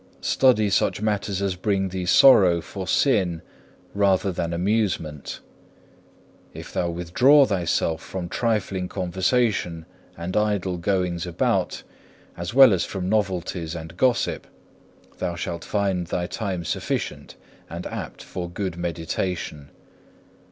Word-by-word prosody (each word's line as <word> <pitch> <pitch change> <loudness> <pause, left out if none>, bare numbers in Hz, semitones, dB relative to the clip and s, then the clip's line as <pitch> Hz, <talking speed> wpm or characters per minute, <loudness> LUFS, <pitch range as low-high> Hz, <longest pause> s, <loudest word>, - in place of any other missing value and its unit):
Study 110 -6 +3
such 95 -1 +1
matters 100 -2 -1
as 100 -2 0
bring 95 +1 0
thee 90 -1 -4
sorrow 95 -8 +7
for 95 +2 -7
sin 95 - +2 0.5
rather 100 -1 +2
than 85 -1 -3
amusement. 85 -5 -1 1.1
If - - -9
thou 85 - 0
withdraw 120 - +4
thyself 85 -5 0
from 90 -2 -5
trifling 100 -3 -1
conversation 95 -2 0 0.3
and 85 +2 -5
idle 100 -4 0
goings 90 -1 -1
about, 85 - 0 0.5
as 85 0 -5
well 130 -3 +8
as 90 - +1
from 95 -2 -4
novelties 90 -5 -1
and 80 0 -8
gossip, 125 +4 +1 0.7
thou 85 - -2
shalt 85 0 -4
find 95 -4 -1
thy 90 +1 -2
time 90 -2 -4
sufficient - - -3 0.3
and - - -6
apt - - -6
for 90 -1 -6
good 90 -1 -4
meditation. 85 -3 -3
95 Hz, 120 wpm, -24 LUFS, 85-100 Hz, 1.1 s, well